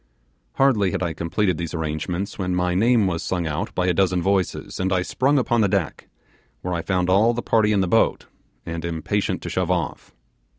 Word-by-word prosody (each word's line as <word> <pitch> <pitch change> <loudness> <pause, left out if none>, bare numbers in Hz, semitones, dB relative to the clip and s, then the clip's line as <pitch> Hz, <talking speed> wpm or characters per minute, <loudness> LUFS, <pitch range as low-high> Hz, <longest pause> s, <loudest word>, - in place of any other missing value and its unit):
Hardly 115 -8 +3
had 90 - -2
I 85 -2 -2
completed 85 +2 -1
these 85 0 -4
arrangements 80 +6 -3
when 90 -1 -1
my 90 0 0
name 115 +3 +3
was 85 -3 -1
sung 90 -2 -2
out 80 +7 -3
by 90 - +1
a 90 - +2
dozen 90 0 +2
voices, 95 0 -1
and 95 +1 0
I 90 -1 +2
sprung 140 +9 +1
upon 120 -3 +2
the 105 - +4
deck, 95 -6 -2 0.5
where 90 - -3
I 85 - -1
found 90 0 0
all 105 +6 +4
the 120 - -3
party 110 -2 +2
in 100 -2 +2
the 95 - 0
boat, 115 +5 +2 0.4
and 85 0 -5
impatient 85 +4 -2
to - - -4
shove 90 -2 -1
off. 85 -5 -2
90 Hz, 205 wpm, -23 LUFS, 85-105 Hz, 0.5 s, the